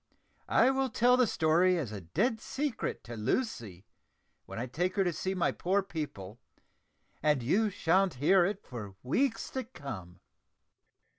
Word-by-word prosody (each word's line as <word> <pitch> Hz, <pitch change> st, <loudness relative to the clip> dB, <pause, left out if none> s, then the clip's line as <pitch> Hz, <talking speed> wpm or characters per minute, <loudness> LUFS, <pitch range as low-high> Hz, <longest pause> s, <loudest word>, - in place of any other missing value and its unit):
I 260 Hz, -, +5 dB
will 270 Hz, 0 st, 0 dB
tell 245 Hz, +1 st, +4 dB
the 250 Hz, -2 st, +3 dB
story 175 Hz, +2 st, +3 dB
as 135 Hz, -10 st, -3 dB
a 105 Hz, -2 st, -6 dB
dead 220 Hz, -, 0 dB
secret 280 Hz, -2 st, -3 dB
to 120 Hz, -, -8 dB
Lucy, 110 Hz, -, -2 dB, 0.6 s
when -, -, -8 dB
I 120 Hz, -, -2 dB
take 175 Hz, +9 st, -2 dB
her 195 Hz, -, +3 dB
to 175 Hz, -2 st, 0 dB
see 190 Hz, +4 st, -2 dB
my 180 Hz, -, +1 dB
poor 195 Hz, +3 st, 0 dB
people, 120 Hz, -, -6 dB, 0.8 s
and 150 Hz, -4 st, +2 dB
you 210 Hz, -, +2 dB
sha'n't 185 Hz, -1 st, +2 dB
hear 175 Hz, +8 st, +4 dB
it 200 Hz, +3 st, -2 dB
for 105 Hz, -6 st, -8 dB
weeks 230 Hz, -, 0 dB
to 260 Hz, -, -3 dB
come." 105 Hz, -, -9 dB
175 Hz, 155 wpm, -31 LUFS, -, 0.8 s, I